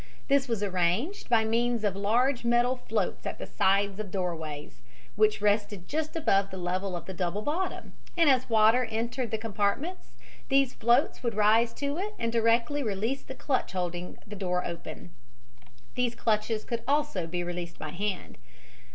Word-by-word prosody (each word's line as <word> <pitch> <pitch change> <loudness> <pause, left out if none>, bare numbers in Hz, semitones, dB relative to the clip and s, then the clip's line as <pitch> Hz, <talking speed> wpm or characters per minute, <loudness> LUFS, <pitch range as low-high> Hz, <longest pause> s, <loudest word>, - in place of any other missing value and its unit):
This 275 0 +3
was 225 -4 -1
arranged 190 - 0
by 225 -2 +4
means 235 0 +1
of 200 -3 +1
large 235 +6 +2
metal 240 +2 +3
floats 250 - -2
at - - -4
the - - -6
side 200 +1 +3
of 195 - -13
the 215 - -2
doorways, 165 -6 -4 0.3
which 430 -1 +3
rested 205 -3 +1
just 310 +1 -2
above 200 -12 +2
the 190 - -7
level 185 +1 -2
of 170 -2 -6
the 190 - -6
double 180 +3 -2
bottom, 350 - -2 0.2
and 335 -2 +5
as 260 -2 +4
the - - -15
water 225 +3 +5
entered 235 +2 -2
the 220 - -1
compartments 225 - -2 0.3
these 275 -2 +3
floats 240 +5 +2
would 235 -3 -2
rise 220 +2 +4
to 285 +3 -2
it 420 +2 -4
and 230 -1 -1
directly 235 +5 +2
release 225 +4 -1
the 265 - -9
clutch 265 -7 -1
holding 180 -1 -3
the 210 - -8
door 180 -2 -1
open. 170 0 -7 0.8
These 245 -1 0
clutches 215 -1 0
could 235 -1 -3
also 285 - +1
be 175 +1 -2
released 175 -1 -5
by 155 - -6
hand. 195 +3 -4
220 Hz, 175 wpm, -29 LUFS, 190-250 Hz, 0.8 s, and